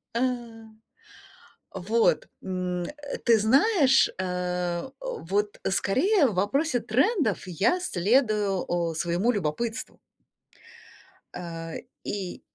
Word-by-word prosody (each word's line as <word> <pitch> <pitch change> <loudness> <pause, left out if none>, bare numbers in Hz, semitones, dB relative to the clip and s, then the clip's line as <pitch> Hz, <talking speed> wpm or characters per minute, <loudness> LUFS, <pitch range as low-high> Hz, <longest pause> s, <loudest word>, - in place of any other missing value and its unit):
А. 235 - +1 1.5
Вот, 215 +5 +1
м, 180 -1 -3
э, 290 - -7
ты 230 -3 +5
знаешь, 270 - +4
э, 180 +2 -2
вот 210 - -2
скорее 290 - +3
в 205 - -4
вопросе 245 - +1
трендов 270 - +1
я 195 - +1
следую, 210 - +1 0.3
э, - - -8
своему 175 +8 +1
любопытству. 220 +6 -3 1.4
Э, 165 -2 -6 0.3
и 195 -3 -4
205 Hz, 90 wpm, -26 LUFS, 180-265 Hz, 1.5 s, ты